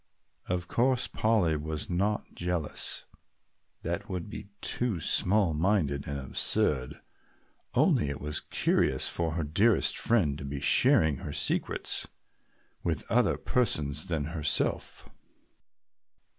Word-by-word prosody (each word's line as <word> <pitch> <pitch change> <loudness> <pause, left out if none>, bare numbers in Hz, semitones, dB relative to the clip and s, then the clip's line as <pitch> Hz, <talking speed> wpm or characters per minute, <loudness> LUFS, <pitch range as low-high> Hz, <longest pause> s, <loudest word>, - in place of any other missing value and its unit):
Of 90 0 -2
course 125 +3 +1
Polly 105 -8 +1
was 75 +1 -4
not 100 +4 -1
jealous, 85 -3 -2 0.8
that 100 +6 -4
would 90 +1 -5
be 105 -2 -8
too 120 -8 0
small 95 +2 +2
minded 75 -4 0
and 70 0 -3
absurd, 65 0 +1 0.8
only 75 - +3
it 70 - -5
was 75 +1 -2
curious - - +1
for 85 -2 -1
her 85 0 -2
dearest 100 +9 +2
friend 80 -12 +2
to - - -7
be 70 0 -5
sharing 75 +1 +4
her - - -7
secrets - - 0 0.7
with - - -2
other - - +3
persons 75 - 0
than 80 -4 -1
herself. 75 -3 -1
85 Hz, 115 wpm, -29 LUFS, 75-100 Hz, 0.8 s, sharing